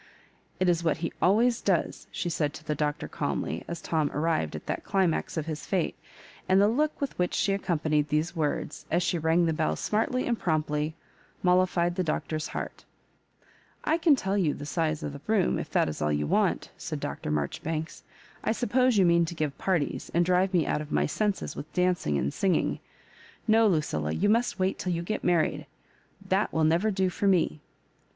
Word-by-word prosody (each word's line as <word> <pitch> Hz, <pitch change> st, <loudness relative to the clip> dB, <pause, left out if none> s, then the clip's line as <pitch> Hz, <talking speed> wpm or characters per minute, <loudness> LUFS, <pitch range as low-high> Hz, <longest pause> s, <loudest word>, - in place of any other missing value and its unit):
" -, -, -36 dB
It 185 Hz, -, +2 dB
is 170 Hz, -1 st, +2 dB
what 165 Hz, -3 st, +1 dB
he -, -, -3 dB
always 230 Hz, +6 st, +3 dB
does," -, -, 0 dB
she -, -, -3 dB
said 150 Hz, -3 st, -1 dB
to -, -, -10 dB
the 155 Hz, -, 0 dB
Doctor, 150 Hz, 0 st, -2 dB
oalmly, -, -, -3 dB
as 170 Hz, -, -5 dB
Tom 155 Hz, -3 st, 0 dB
arrived 150 Hz, -, 0 dB
at -, -, -7 dB
that -, -, -3 dB
climax 185 Hz, -4 st, 0 dB
of 155 Hz, -, -1 dB
his 155 Hz, -2 st, -5 dB
fate; 185 Hz, -4 st, 0 dB, 0.5 s
and 190 Hz, +1 st, +5 dB
the 200 Hz, -, +5 dB
look 295 Hz, +7 st, 0 dB
with 280 Hz, -2 st, -3 dB
which 180 Hz, -, +1 dB
she 200 Hz, -, +2 dB
accompanied 155 Hz, -6 st, 0 dB
these 155 Hz, +3 st, 0 dB
words, 155 Hz, -1 st, -2 dB
as 175 Hz, +2 st, +2 dB
she 175 Hz, 0 st, 0 dB
rang 165 Hz, +2 st, +3 dB
the 165 Hz, -, +1 dB
bell 80 Hz, -, 0 dB
smartly 225 Hz, -, 0 dB
and 235 Hz, -2 st, 0 dB
prompt 155 Hz, -3 st, 0 dB
ly, 150 Hz, +1 st, -1 dB, 0.5 s
mollified 180 Hz, -1 st, +3 dB
the 185 Hz, +1 st, -1 dB
Doctor's 155 Hz, -1 st, -2 dB
heart -, -, -6 dB, 1.0 s
I' -, -, +1 dB
I -, -, +4 dB
can 320 Hz, -4 st, +5 dB
tell 195 Hz, -6 st, -1 dB
you 170 Hz, -8 st, +1 dB
the 145 Hz, -, -7 dB
size 155 Hz, 0 st, -1 dB
of 145 Hz, -, -4 dB
the 140 Hz, -, -9 dB
room, 215 Hz, -4 st, +2 dB
if -, -, -5 dB
that -, -, +2 dB
is 75 Hz, -, -5 dB
all 75 Hz, 0 st, +1 dB
you 75 Hz, 0 st, 0 dB
want," -, -, +1 dB
said -, -, -4 dB
Dr. -, -, -4 dB
Marjoribanks. 155 Hz, -, -3 dB, 0.2 s
" -, -, -26 dB
I 220 Hz, -, +1 dB
sup 235 Hz, -2 st, -3 dB
pose 255 Hz, -2 st, +4 dB
you 190 Hz, -, +5 dB
mean 170 Hz, 0 st, +4 dB
to 170 Hz, -, -6 dB
give 150 Hz, -3 st, -2 dB
parties, 175 Hz, -7 st, -1 dB
and 170 Hz, 0 st, +4 dB
drive 185 Hz, +1 st, +2 dB
me 175 Hz, -5 st, +2 dB
out 150 Hz, -, 0 dB
of 150 Hz, -1 st, -8 dB
my -, -, +2 dB
senses 205 Hz, +5 st, -1 dB
with 150 Hz, -, -7 dB
dancing 180 Hz, -, +1 dB
and 70 Hz, 0 st, -1 dB
singing. 190 Hz, -4 st, +1 dB, 0.7 s
No, 220 Hz, 0 st, +5 dB
LuciUa, 80 Hz, -, -1 dB
you 205 Hz, +3 st, +3 dB
must 235 Hz, +3 st, +2 dB
wait 190 Hz, 0 st, 0 dB
till 180 Hz, -, -1 dB
you 170 Hz, 0 st, -2 dB
get 215 Hz, +5 st, -3 dB
married 155 Hz, -4 st, +1 dB, 0.3 s
— 195 Hz, -, -23 dB
that 195 Hz, +3 st, +2 dB
will 160 Hz, -, +1 dB
never 170 Hz, +7 st, +3 dB
do 190 Hz, -2 st, +1 dB
for 200 Hz, -, -1 dB
me." 180 Hz, -5 st, +2 dB
170 Hz, 210 wpm, -28 LUFS, 155-195 Hz, 1.0 s, and